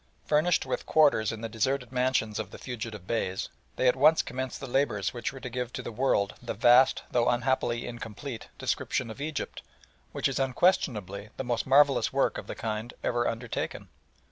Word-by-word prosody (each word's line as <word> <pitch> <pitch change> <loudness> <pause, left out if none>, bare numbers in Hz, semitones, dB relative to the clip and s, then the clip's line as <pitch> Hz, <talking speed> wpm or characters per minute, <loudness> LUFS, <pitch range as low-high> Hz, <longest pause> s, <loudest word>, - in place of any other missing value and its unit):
Furnished 155 +4 +2
with - - -3
quarters 145 -9 +4
in 110 -1 -6
the 115 - -3
deserted 125 +3 -1
mansions 125 -4 0
of 110 - -4
the - - -10
fugitive 115 -6 -6
Beys, 95 -4 -2 0.3
they 130 - +2
at 125 - +5
once 155 +4 +5
commenced 130 0 -4
the - - -6
labours 125 -6 0
which 120 - -3
were 135 - -9
to 130 - -6
give 125 0 -3
to - - -5
the - - -5
world 110 -4 +1
the - - -4
vast, 120 +5 +5
though 120 -1 +3
unhappily 120 -1 0
incomplete, 120 +1 -7
description 115 - -1
of 125 - -9
Egypt, 155 0 -4 0.5
which - - 0
is 135 - -2
unquestionably 115 - +1
the - - -2
most 120 -1 -1
marvellous 140 +1 +5
work 135 0 +1
of - - -10
the - - -5
kind 110 +1 -4
ever 120 0 +1
undertaken. 115 0 -4
125 Hz, 185 wpm, -28 LUFS, 110-135 Hz, 0.5 s, at